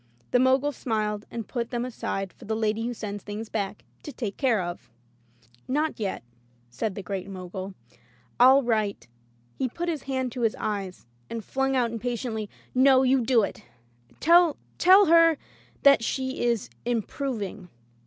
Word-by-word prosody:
The 245 - +4
Mogul 265 +3 +3
smiled 215 -5 -2
and 230 -2 -6
put 235 -2 -3
them 240 0 -2
aside 195 -6 -4
for - - -14
the 220 - -1
lady 220 +1 0
who 245 - -2
sends 205 -2 -6
thing& 210 +1 -5
back 200 -1 -3 0.2
to 295 - -7
take 220 -8 -4
care 250 -6 +2
of. 175 -7 -5 0.8
"Not 300 +2 -1
yet," 195 - -3 0.5
said 190 - -3
the 200 - -6
Great 195 0 -4
Mogul. 185 0 -7 0.6
"FU 260 +3 +7
write 215 -5 -1 0.2
— 120 0 -36
". 120 0 -36
He 260 - 0
put 345 +8 -3
his 315 -5 -2
hand 260 -2 -1
to 250 - -5
his 225 -2 +2
eyes, 200 - -4 0.2
and 230 -3 -5
flung 270 0 0
out 240 -3 +1
impatiently, 230 -2 -3 0.2
"No, 260 0 +5
you 260 0 +3
do 230 -2 +4
it. - - -5 0.6
Tell 345 +2 +6
her 305 - -7
— - - -36
tell 380 +3 +7
her 330 -1 +6 0.5
that 280 -4 +6
she 260 +2 -2
is 235 -3 0
improving." 225 -4 -3
230 Hz, 175 wpm, -26 LUFS, 205-265 Hz, 0.8 s, FU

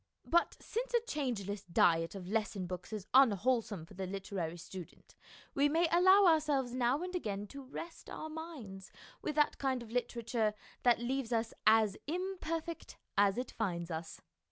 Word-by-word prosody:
But 345 +1 +2
since - - -3
a 475 - +4
changeless 210 - -2
diet 165 0 +3
of 185 -2 -7
lesson 210 -2 -1
books 180 +2 -6
is 210 -3 -4
unwholesome 230 -6 +3
for 185 - -15
the 190 0 -4
literary 185 -3 -4
student, 180 0 -10 0.4
we 285 +1 +3
may 330 +3 +3
allow 375 +3 +7
ourselves 295 -7 +3
now 255 +5 +1
and 365 0 -5
again 205 - -2
to 280 - -8
rest 305 +5 -8
our 315 - -5
minds 300 - -8 0.3
with 300 - -3
that 300 -1 +2
kind 260 -3 0
of 225 - -12
literature 235 -2 0 0.3
that 245 -1 +5
leaves 250 0 -2
us 225 -1 0
as 220 -2 +5
imperfect 335 -1 -4 0.2
as 200 0 +4
it 250 0 -3
finds 175 -5 -2
us. 160 +1 -5
235 Hz, 160 wpm, -34 LUFS, 195-305 Hz, 0.4 s, allow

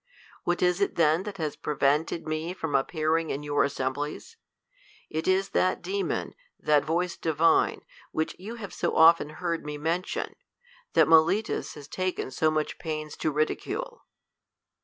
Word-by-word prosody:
What 175 +1 +1
is 180 +2 +2
it 200 - +1
then 160 +1 +3
that 200 - -10
has 155 -4 -2
prevented 150 +3 0
me 155 +3 -2
from 160 -5 -4
ap 135 - +2
pearing 160 0 0
in 140 +2 -3
your 145 0 +2
assemblies? 140 - -3 0.8
It 160 +1 -2
is 190 +1 +2
that 185 - +1
demon, 195 +2 -2 0.3
that 150 -1 +3
voice 170 +2 -1
divine, 160 0 +2 0.3
which 160 0 -2
you 215 +5 -7
have 210 -4 -8
so - - -1
often 165 -2 +6
heard 170 +1 -3
me 150 0 -5
men 165 +4 0
tion, - - -5 0.6
and - - +6
Melitus 165 +7 +3
has 145 -2 -10
taken 185 -5 -3
so 155 - +2
much 155 -1 -2
pains 155 -2 -4
to - - 0
ridicule. 470 - -2
160 Hz, 160 wpm, -27 LUFS, 150-180 Hz, 0.8 s, often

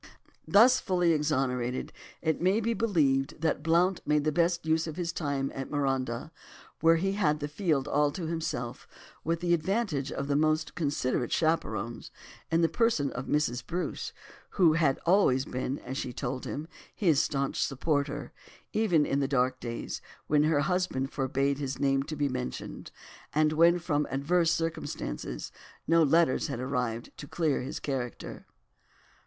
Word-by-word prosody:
'" - - -36
Thus 250 +4 +7
fully 180 -2 +2
exonerated, 130 -5 -1 0.3
it 160 -1 0
may 190 +4 +3
be 230 +1 0
believed 150 -14 +1
that 160 -2 0
Blount 170 +4 +2
made 150 -1 +2
the 155 - +1
best 170 +1 +1
use 160 +1 +1
of 155 - -5
his 170 -1 -3
time 140 -4 -2
at 135 -1 -5
Marondah, 135 -2 -1 0.5
where 165 0 +5
he 190 +4 0
had 155 -7 +1
the 145 - -3
field 150 -3 0
all 145 0 +2
to 180 - -4
himself 160 -7 -4 0.4
with 165 +1 -1
the 175 -1 +2
advantage 170 - 0
of 140 - -3
the 140 - +1
most 155 +1 +1
considerate 140 -6 -1
of - - 0
chaperons, 120 -9 -1 0.4
in 165 +1 +2
the 165 - +5
person 165 - +1
of 125 +2 -5
Mrs. 125 -5 0
Bruce, 180 +7 -3 0.5
who 170 -5 +6
had 155 -5 +2
always 165 -8 +4
been, 130 +2 -3
as 130 0 -6
she 125 - -3
told 130 +1 -4
him, 150 +3 -5 0.3
his 165 -8 +3
staunch 140 -1 -1
supporter, 145 +1 -1 0.4
even 180 -9 +3
in 140 - 0
the 140 - +1
dark 130 -1 +1
days, 120 -1 -5 0.2
when 150 0 +3
her 155 -2 +3
husband 170 -5 -1
forbade 135 +1 0
his 135 -2 -3
name 135 -1 +2
to 155 +3 -5
be 145 -1 +1
mentioned, 65 - -5 0.5
and 155 0 +3
when 170 +2 +5
from 150 -4 -1
adverse 165 +5 +2
circumstances 165 - -3 0.3
no 165 +1 +4
letters 160 -1 +3
had - - -4
arrived 125 -3 -2
to 145 - -8
clear 155 -1 0
his 130 +3 -5
character. 130 -4 -5
150 Hz, 165 wpm, -29 LUFS, 135-165 Hz, 0.5 s, Thus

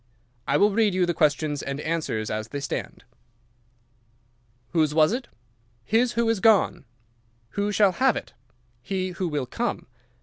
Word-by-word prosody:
I 140 - +3
will 205 +6 +4
read 210 -2 +2
you 185 -1 +3
the 175 - 0
questions 150 -1 +1
and 140 +1 -4
answers 150 -10 -2
as 110 0 -3
they 140 +5 -5
stand. 140 - -5 1.7
"'Whose 155 -3 +1
was 155 +1 +5
it?' 245 0 -3 0.6
"'His 235 - +2
who 235 0 +1
is 225 -3 +1
gone.' 215 -8 +3 0.6
"'Who 205 +6 -1
shall 205 -1 +4
have 255 +5 +2
it?' - - -6 0.5
"'He 185 +4 -2
who 180 0 -3
will 145 -5 -2
come. - - -3
175 Hz, 155 wpm, -25 LUFS, 145-210 Hz, 1.7 s, was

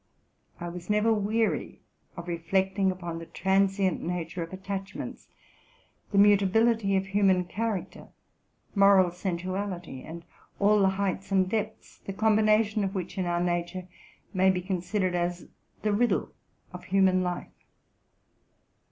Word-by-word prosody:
I 175 - -5
was 175 +1 -8
never 210 +2 +3
weary 215 +1 -1 0.4
of 170 0 -7
reflecting 190 +3 0
upon 175 -3 -4
the 165 - -9
transient 190 +2 +1
nature 175 0 -4
of 165 - -5
attach 195 +1 -5
ments, - - -7 0.8
the 200 - 0
mutability 205 +1 +4
of 190 0 +1
human 195 -2 +2
character, 215 +1 -4 0.7
moral 195 -3 +5
sensuality, 180 -4 -4
and 165 +1 -9 0.3
all 205 +1 +4
the 195 -1 +4
heights 195 0 -2
and 190 -1 +3
depths, 215 +2 -4
the 195 - -7
combination 215 0 +3
of 195 +1 -2
which 185 -2 -4
in 180 - -1
our 175 0 0
nature 175 +1 -2 0.5
may 190 0 +4
be 180 -1 0
considered 185 0 -1
as 175 0 -2 0.4
the 210 -1 +1
riddle 240 +3 +1 0.4
of 180 - -9
human 190 -1 +3
life. 180 -1 -4
190 Hz, 135 wpm, -28 LUFS, 180-200 Hz, 0.8 s, moral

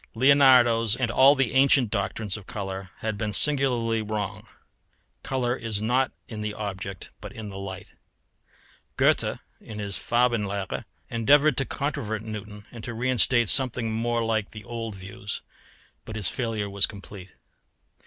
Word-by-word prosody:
Leonardo's 125 -4 +5
and 120 -2 -1
all 135 +3 +6
the 130 -5 0
ancient 130 -4 +4
doctrines 100 -1 -2
of 100 -3 -10
colour 95 -2 -5
had 110 -2 -3
been 110 -1 -1
singularly 120 -3 +3
wrong; 105 -2 -4 0.7
colour 125 -2 -1
is 115 -4 -3
not 125 +5 +1 0.2
in 110 -3 -7
the 105 0 -3
object 95 -3 -6
but - - -8
in 110 -2 -8
the 95 - -8
light. 95 -1 -8 1.0
Goethe, - - +2 0.2
in 110 - -10
his 100 -1 -4
Farbenlehre, 105 -5 0 0.3
endeavoured 140 +5 +4
to 135 - +1
controvert 110 -8 -3
Newton, 105 -1 -8
and 115 -3 -10
to 120 - -5
reinstate 120 -1 +2
something 125 -3 +2
more 115 +1 0
like 110 -2 -1
the 110 -1 -10
old 115 -1 -5
views; 100 +1 -7 0.6
but 110 - -8
his 105 -5 +1
failure 115 -5 -2
was 100 0 +2
complete. 100 -1 -11
110 Hz, 145 wpm, -26 LUFS, 105-125 Hz, 1.0 s, all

